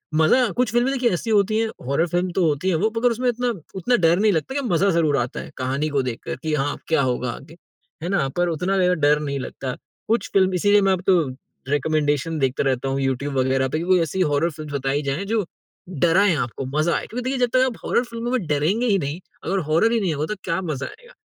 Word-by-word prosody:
मज़ा 225 Hz, +11 st, +4 dB
कुछ 250 Hz, -3 st, +1 dB
फ़िल्में 240 Hz, +3 st, +2 dB
देखिए 250 Hz, -3 st, +2 dB
ऐसी 225 Hz, +6 st, -3 dB
होती 215 Hz, 0 st, +3 dB
हैं, 225 Hz, -, +1 dB, 0.2 s
हॉरर 160 Hz, +5 st, +1 dB
फ़िल्म 175 Hz, +2 st, -1 dB
तो 180 Hz, -1 st, +1 dB
होती 150 Hz, +5 st, 0 dB
हैं 175 Hz, -, +2 dB
वो 215 Hz, +6 st, +1 dB
मगर 245 Hz, +1 st, +3 dB
उसमें 250 Hz, +2 st, -1 dB
इतना 245 Hz, +1 st, -1 dB, 0.3 s
उतना 215 Hz, +7 st, +1 dB
डर 170 Hz, -3 st, +3 dB
नहीं 210 Hz, 0 st, +4 dB
लगता 165 Hz, +10 st, -1 dB
लेकिन 275 Hz, -4 st, -1 dB
मज़ा 185 Hz, +4 st, +3 dB
ज़रूर 160 Hz, -5 st, +2 dB
आता 120 Hz, 0 st, -2 dB
है, -, -, -8 dB
कहानी 135 Hz, +4 st, -1 dB
को 140 Hz, -2 st, +1 dB
देखकर 125 Hz, -3 st, -4 dB
कि 155 Hz, -, -1 dB
हाँ, 145 Hz, 0 st, 0 dB
अब -, -, -10 dB
क्या 160 Hz, -, +2 dB
होगा 125 Hz, -1 st, -1 dB
आगे, 155 Hz, +3 st, -11 dB, 0.5 s
है 175 Hz, -, -2 dB
ना? 180 Hz, -8 st, +1 dB
पर 175 Hz, 0 st, +2 dB
उतना 180 Hz, +4 st, -1 dB
ज़्यादा 180 Hz, -1 st, +3 dB
डर 150 Hz, +1 st, +4 dB
नहीं 140 Hz, -2 st, -3 dB
लगता। 130 Hz, 0 st, -5 dB, 0.3 s
कुछ 225 Hz, +2 st, 0 dB
फ़िल्म 190 Hz, -1 st, +3 dB
इसीलिए 205 Hz, +3 st, +4 dB
मैं 195 Hz, -1 st, +3 dB
अब 180 Hz, -, -2 dB
तो 185 Hz, -3 st, +5 dB, 0.5 s
रिकमेंडेशन 150 Hz, +1 st, 0 dB
देखता 135 Hz, 0 st, 0 dB
रहता 135 Hz, -1 st, 0 dB
हूँ, 135 Hz, +1 st, -1 dB
यूट्यूब 135 Hz, +2 st, -1 dB
वगैरह 130 Hz, 0 st, +2 dB
पे 155 Hz, -, -1 dB
कि -, -, -3 dB
कोई 185 Hz, -1 st, +4 dB
ऐसी 165 Hz, +4 st, -1 dB
हॉरर 150 Hz, 0 st, +2 dB
फ़िल्म्स 155 Hz, -1 st, -8 dB
बताई 135 Hz, +1 st, 0 dB
जाए, 140 Hz, +8 st, -2 dB
जो 215 Hz, -2 st, 0 dB, 0.4 s
डराए 175 Hz, +4 st, +3 dB
आपको, 130 Hz, -1 st, -3 dB
मज़ा 170 Hz, +2 st, +2 dB
आए। -, -, -2 dB
क्योंकि 245 Hz, +2 st, -5 dB
देखिए 270 Hz, -, -1 dB
जब 245 Hz, -1 st, +2 dB
तक 255 Hz, 0 st, +5 dB
आप 250 Hz, -3 st, -3 dB
हॉरर -, -, +2 dB
फ़िल्मों 235 Hz, 0 st, -5 dB
में 245 Hz, -9 st, 0 dB
डरेंगे 160 Hz, +11 st, +1 dB
ही 200 Hz, -3 st, +3 dB
नहीं, 145 Hz, +2 st, -3 dB, 0.2 s
अगर 195 Hz, -, 0 dB
हॉरर 170 Hz, +9 st, +3 dB
ही 235 Hz, -, +2 dB
नहीं 180 Hz, -5 st, 0 dB
होगा 150 Hz, +1 st, -2 dB
तो -, -, -6 dB
क्या 165 Hz, +3 st, -1 dB
मज़ा 150 Hz, -6 st, -3 dB
आएगा, -, -, -14 dB
170 Hz, 245 wpm, -22 LUFS, 145-205 Hz, 0.5 s, तो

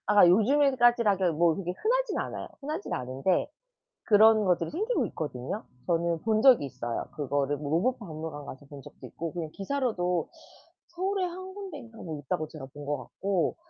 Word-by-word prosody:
아 205 Hz, -3 st, +7 dB
요즘에까지라 240 Hz, 0 st, +4 dB
그 190 Hz, -, 0 dB
뭐 165 Hz, +1 st, +3 dB
그게 180 Hz, -3 st, -3 dB
흔하진 -, -, +1 dB
않아요. -, -, -4 dB
흔하진 305 Hz, +6 st, -4 dB
않은데 130 Hz, +8 st, 0 dB, 0.6 s
그런 220 Hz, 0 st, +6 dB
것들이 175 Hz, -2 st, +1 dB
생기고 435 Hz, +9 st, 0 dB
있거든요. 145 Hz, -, -5 dB, 0.2 s
저는 170 Hz, 0 st, 0 dB
본 220 Hz, -1 st, +2 dB
적이 250 Hz, -, +6 dB
있어요. 120 Hz, -3 st, -4 dB
그거를 145 Hz, 0 st, 0 dB
뭐 145 Hz, 0 st, -5 dB
로봇 245 Hz, +12 st, +1 dB
박물관 155 Hz, -6 st, -7 dB
가서 140 Hz, +1 st, -10 dB
본 140 Hz, -1 st, -10 dB
적도 -, -, -13 dB
있고 165 Hz, 0 st, -6 dB
그냥 170 Hz, -3 st, -4 dB
기사로도 195 Hz, -7 st, -1 dB, 0.6 s
서울에 375 Hz, +2 st, -1 dB
1 370 Hz, +2 st, -7 dB
군데인가 295 Hz, -, -9 dB
뭐 160 Hz, -4 st, -6 dB
있다고 150 Hz, +2 st, -2 dB
제가 150 Hz, -4 st, -9 dB
본 145 Hz, 0 st, -9 dB
것 145 Hz, +1 st, -1 dB
같고 180 Hz, +8 st, -1 dB
185 Hz, 360 characters per minute, -28 LUFS, 155-255 Hz, 0.6 s, 아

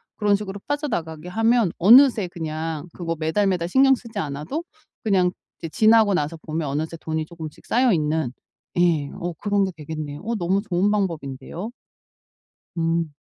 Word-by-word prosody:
그런 205 Hz, -2 st, +2 dB
식으로 200 Hz, -1 st, -5 dB
빠져나가게 180 Hz, -, -3 dB
하면 225 Hz, -1 st, +2 dB
어느새 230 Hz, 0 st, +7 dB
그냥 160 Hz, -1 st, -4 dB
그거 165 Hz, -2 st, -3 dB
매달 160 Hz, +6 st, +1 dB
매달 175 Hz, -3 st, 0 dB
신경 270 Hz, +3 st, +5 dB
쓰지 230 Hz, -4 st, -6 dB
않아도 155 Hz, -, -3 dB, 0.4 s
그냥 190 Hz, -4 st, +3 dB, 0.3 s
이제 165 Hz, -, -5 dB
지나고 220 Hz, +2 st, +5 dB
나서 160 Hz, 0 st, -1 dB
보면 155 Hz, -1 st, -4 dB
어느새 160 Hz, +4 st, -3 dB
돈이 160 Hz, 0 st, -3 dB
조금씩 160 Hz, -2 st, -10 dB
쌓여있는 160 Hz, -, +2 dB, 0.5 s
예. 160 Hz, -5 st, +2 dB
어 175 Hz, 0 st, -3 dB
그런 200 Hz, +3 st, 0 dB
게 190 Hz, -, -3 dB
되겠네요. 150 Hz, -1 st, -6 dB
어 230 Hz, +2 st, -2 dB
너무 190 Hz, +1 st, +1 dB
좋은 195 Hz, 0 st, +1 dB
방법인데요? 170 Hz, -, -3 dB, 1.1 s
음. 165 Hz, -1 st, 0 dB
175 Hz, 330 characters per minute, -23 LUFS, 160-210 Hz, 1.1 s, 어느새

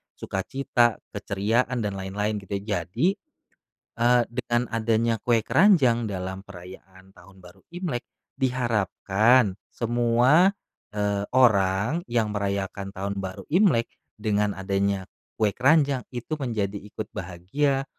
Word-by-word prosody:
sukacita, 120 Hz, +3 st, 0 dB
keceriaan, 115 Hz, +6 st, -1 dB
dan 100 Hz, -2 st, -3 dB
lain-lain 105 Hz, +3 st, -2 dB
gitu, 100 Hz, 0 st, -5 dB
jadi, 105 Hz, -, -1 dB, 0.9 s
eee, 120 Hz, +1 st, +4 dB
dengan 120 Hz, 0 st, -1 dB
adanya 115 Hz, 0 st, +1 dB
kue 120 Hz, -2 st, +2 dB
keranjang 130 Hz, -, +4 dB
dalam 95 Hz, 0 st, -5 dB
perayaan 95 Hz, 0 st, -13 dB
Tahun 100 Hz, -1 st, -17 dB
Baru 90 Hz, -1 st, -16 dB
Imlek, 175 Hz, -9 st, -3 dB, 0.3 s
diharapkan 115 Hz, -3 st, +2 dB, 0.2 s
semua, 120 Hz, -, +3 dB, 0.4 s
eee, 100 Hz, -1 st, -1 dB
orang 110 Hz, -, +3 dB
yang 115 Hz, -3 st, +1 dB
merayakan 100 Hz, -1 st, -3 dB
Tahun 100 Hz, +1 st, -4 dB
Baru 95 Hz, -1 st, -5 dB
Imlek, 160 Hz, -, +3 dB, 0.3 s
dengan 105 Hz, -1 st, 0 dB
adanya 100 Hz, 0 st, -1 dB, 0.3 s
kue 110 Hz, -1 st, +3 dB
keranjang, 140 Hz, 0 st, +3 dB
itu 125 Hz, +5 st, -5 dB
menjadi 105 Hz, -6 st, -2 dB
ikut 105 Hz, +1 st, -8 dB
bahagia, 115 Hz, -, -1 dB
110 Hz, 110 wpm, -25 LUFS, 100-125 Hz, 0.9 s, eee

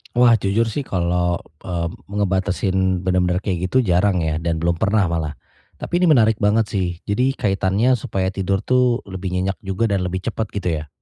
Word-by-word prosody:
Wah, 120 Hz, -2 st, +5 dB
jujur 100 Hz, +3 st, +1 dB
sih 140 Hz, +3 st, -4 dB
kalau, 90 Hz, -1 st, 0 dB, 0.3 s
eee, 85 Hz, -2 st, -2 dB, 0.2 s
ngebatasin 95 Hz, -2 st, 0 dB
bener-bener 90 Hz, 0 st, +1 dB
kayak 90 Hz, -2 st, -1 dB
gitu 130 Hz, +7 st, +2 dB
jarang 90 Hz, -2 st, +2 dB
ya 80 Hz, -1 st, -1 dB
dan 85 Hz, 0 st, -1 dB
belum 85 Hz, 0 st, 0 dB
pernah 105 Hz, -1 st, +2 dB
malah. 80 Hz, -3 st, -2 dB, 0.4 s
Tapi 175 Hz, -, -2 dB
ini 180 Hz, -, +3 dB
menarik 110 Hz, -7 st, +4 dB
banget 105 Hz, +2 st, +3 dB
sih. 95 Hz, -3 st, 0 dB, 0.2 s
Jadi 125 Hz, +6 st, 0 dB
kaitannya 100 Hz, +4 st, +1 dB
supaya 95 Hz, -2 st, -2 dB
tidur 95 Hz, 0 st, -1 dB
tuh 125 Hz, -1 st, +2 dB
lebih 95 Hz, -1 st, -6 dB
nyenyak 95 Hz, +2 st, -1 dB
juga 95 Hz, +3 st, -1 dB
dan 95 Hz, -2 st, 0 dB
lebih 95 Hz, +1 st, -3 dB
cepet 110 Hz, 0 st, -2 dB
gitu 100 Hz, -3 st, -1 dB
ya? 75 Hz, -, -11 dB
95 Hz, 180 wpm, -21 LUFS, 90-110 Hz, 0.4 s, Wah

